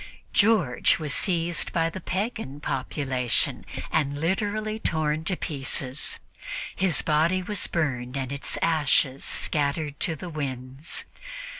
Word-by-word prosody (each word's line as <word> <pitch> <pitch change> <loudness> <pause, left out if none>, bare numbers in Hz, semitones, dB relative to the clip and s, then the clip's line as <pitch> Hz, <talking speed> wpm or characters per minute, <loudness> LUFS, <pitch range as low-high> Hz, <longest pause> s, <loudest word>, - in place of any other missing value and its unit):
George 200 - +4
was 150 -4 -2
seized 170 -3 +2
by 165 -1 +2
the 185 +3 -5
pagan 190 - -3
population 130 -3 -1 0.3
and 145 -3 +1
literally 210 +5 0
torn 155 -4 0
to 185 - +1
pieces; 135 -3 0 0.6
his 185 -3 +2
body 165 +5 +2
was 205 +1 -1
burned 135 -6 -1
and 130 -1 -3
its 140 0 -3
ashes 145 -4 +3
scattered 145 0 +1
to 165 -3 0
the 175 - -7
winds. 135 0 -3
155 Hz, 120 wpm, -26 LUFS, 140-180 Hz, 0.6 s, George